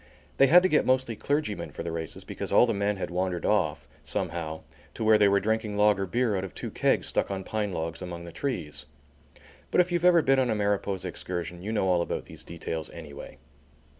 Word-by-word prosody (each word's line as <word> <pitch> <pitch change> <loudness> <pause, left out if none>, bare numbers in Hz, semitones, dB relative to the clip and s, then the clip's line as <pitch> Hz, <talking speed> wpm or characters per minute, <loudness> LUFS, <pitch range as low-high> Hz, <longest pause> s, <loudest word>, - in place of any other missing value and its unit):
They 135 - +6
had 180 +5 +7
to - - +5
get 155 - +4
mostly 130 -3 +1
clergymen 145 -4 -2
for - - -7
the 85 - -4
races 80 -1 -5
because - - -6
all - - +6
the 115 - 0
men 100 0 0
had 95 - -4
wandered 90 -1 -1
off, 90 -8 +1
somehow, 80 -2 -3 0.3
to - - -3
where 110 -1 +5
they 105 - +6
were 100 0 +4
drinking 110 0 -1
lager 105 -2 +3
beer 120 +1 +1
out 95 - -1
of 95 - -7
two - - -5
kegs - - +1
stuck - - 0
on 95 -1 -3
pine 105 0 -2
logs 80 -1 -4
among 85 -1 -6
the 85 - -8
trees. 85 - -4 0.8
But - - +2
if 180 0 +4
you've 175 -1 0
ever 175 -2 +6
been 135 0 +4
on 130 -2 +2
a 110 - +1
Mariposa 100 -2 -1
excursion 90 -1 -5
you 105 +4 -4
know 105 -4 +1
all 90 -2 +3
about - - -3
these - - -9
details 80 -1 -5
anyway. 75 -4 -10
100 Hz, 220 wpm, -27 LUFS, 85-115 Hz, 0.8 s, had